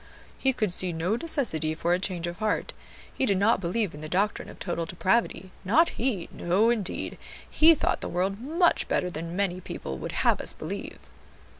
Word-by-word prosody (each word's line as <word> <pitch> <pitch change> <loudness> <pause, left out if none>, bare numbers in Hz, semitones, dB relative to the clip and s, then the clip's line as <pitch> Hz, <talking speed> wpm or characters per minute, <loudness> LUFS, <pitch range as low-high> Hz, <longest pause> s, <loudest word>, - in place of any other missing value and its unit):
"He 265 - +2
could 215 -7 -1
see 180 0 -1
no 170 +6 0
necessity 235 - +1
for 170 +2 +1
a 180 - +2
change 185 -3 -2
of 175 +2 -5
heart; 215 -1 -1 0.4
he 265 - 0
did 200 - +2
not 205 +1 +3
believe 195 +2 -1
in 150 - -9
the 155 - -6
doctrine 200 +4 0
of - - -11
total 170 -2 -3
depravity, 190 +2 0
not 275 - +4
he; 225 -8 -2
no 200 +7 +2
indeed, 210 -6 -3 0.3
he 325 +1 +6
thought - - 0
the - - -4
world 190 +3 -1
much 335 +6 +2
better 180 -1 0
than 165 +1 -5
many 185 -2 -1
people 65 - -6
would - - -5
have - - +2
us - - -1
believe." - - -6
190 Hz, 190 wpm, -27 LUFS, 175-230 Hz, 0.4 s, he